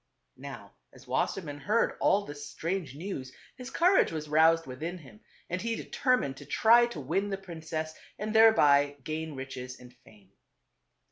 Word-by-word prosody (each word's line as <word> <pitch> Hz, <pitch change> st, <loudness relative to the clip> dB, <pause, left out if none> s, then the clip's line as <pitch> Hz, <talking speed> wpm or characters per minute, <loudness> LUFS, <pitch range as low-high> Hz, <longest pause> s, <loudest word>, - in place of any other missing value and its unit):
Now -, -, -10 dB, 0.2 s
as -, -, -17 dB
Wassermann 150 Hz, -6 st, -2 dB
heard 215 Hz, +8 st, +1 dB
all 200 Hz, +1 st, +3 dB
this 145 Hz, 0 st, -8 dB
strange 170 Hz, -5 st, -3 dB
news 145 Hz, -6 st, -6 dB, 0.2 s
his 250 Hz, 0 st, -8 dB
courage 360 Hz, +7 st, +3 dB
was 155 Hz, -2 st, -5 dB
roused 165 Hz, +2 st, +4 dB
within 155 Hz, +8 st, -5 dB
him 170 Hz, +5 st, -15 dB, 0.3 s
and 185 Hz, +2 st, -3 dB
he 230 Hz, 0 st, -1 dB
determined 250 Hz, -, 0 dB
to 145 Hz, -, -11 dB
try 235 Hz, +8 st, +5 dB
to 210 Hz, -10 st, -7 dB
win 170 Hz, +9 st, -1 dB
the 195 Hz, -, -2 dB
princess 160 Hz, -4 st, -5 dB, 0.2 s
and 215 Hz, +1 st, -4 dB
thereby 145 Hz, -11 st, +5 dB
gain 155 Hz, +1 st, -4 dB
riches 130 Hz, -1 st, -7 dB
and 125 Hz, 0 st, -14 dB
fame. 110 Hz, -6 st, -21 dB
160 Hz, 155 wpm, -29 LUFS, 145-205 Hz, 0.3 s, try